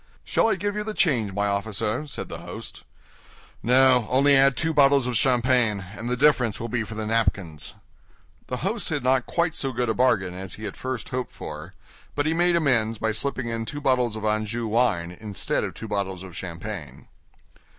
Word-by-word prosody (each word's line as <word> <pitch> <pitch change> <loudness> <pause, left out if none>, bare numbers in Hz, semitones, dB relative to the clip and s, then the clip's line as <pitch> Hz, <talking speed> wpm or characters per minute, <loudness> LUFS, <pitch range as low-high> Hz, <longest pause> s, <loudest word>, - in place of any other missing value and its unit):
"Shall - - +2
I - - +2
give 205 0 -2
you 210 - -2
the 215 0 -5
change, 120 - +2
my 100 +1 -1
officer?" 105 +6 -1
said 140 - -4
the - - -7
host. - - -8 0.8
"No, 125 -1 +4
only 140 +2 +5
add 135 0 +5
two 160 0 +1
bottles 140 -2 +5
of 125 -1 -2
champagne, 120 -5 +2
and 115 +2 -5
the 125 - 0
difference 125 -5 +3
will 115 - -4
be 120 0 -1
for 110 0 -8
the 110 0 -3
napkins." 100 -8 -1 0.7
The 125 - -3
host 205 +1 -1
had 145 -5 -2
not 130 0 +2
quite 170 -1 0
so 135 -5 0
good 125 -1 -1
a - - +2
bargain 110 -7 +2
as 95 0 -6
he 110 - -8
at 100 - -5
first 130 -3 -5
hoped 125 -1 -4
for, - - -8 0.4
but 145 - 0
he 160 - +2
made 175 +1 +3
amends 120 -9 +2
by 110 +1 0
slipping 130 +2 -2
in 115 0 -2
two 145 +6 -5
bottles 125 -5 +1
of 110 -1 -5
Anjou 110 +2 -1
wine 105 -7 +1
instead 105 -3 -2
of - - -4
two 110 - -7
bottles 95 -3 -3
of 90 -3 -10
champagne. 85 - -7
120 Hz, 200 wpm, -25 LUFS, 105-135 Hz, 0.8 s, only